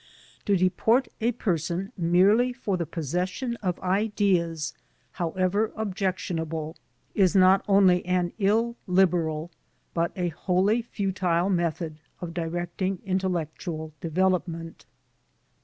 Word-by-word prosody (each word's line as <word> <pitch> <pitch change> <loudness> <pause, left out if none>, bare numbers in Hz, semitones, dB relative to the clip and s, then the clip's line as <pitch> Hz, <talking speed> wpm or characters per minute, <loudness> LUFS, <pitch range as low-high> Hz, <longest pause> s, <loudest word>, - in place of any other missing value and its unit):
To 200 -1 +3
deport 220 +8 +2
a 235 +2 +2
person 185 -3 -2
merely 195 +8 +4
for 215 -6 -2
the 170 -3 -2
possession 180 - -2
of 180 -5 -2
ideas, 185 -5 +1 0.4
however 185 +5 0
objectionable, 180 -6 -2 0.4
is 190 -1 +3
not 190 0 +6
only 190 -3 +5
an 180 -1 +1
illiberal, 185 -7 +1 0.4
but 170 0 0
a 180 -2 -1
wholly 185 +7 +1
futile, 190 -5 0
method 170 -3 -1 0.2
of 170 -2 -6
directing 175 +3 -2
intellectual 170 -4 -2
devel 185 +3 +2
opment. 165 -1 -8
180 Hz, 105 wpm, -26 LUFS, 170-195 Hz, 0.4 s, not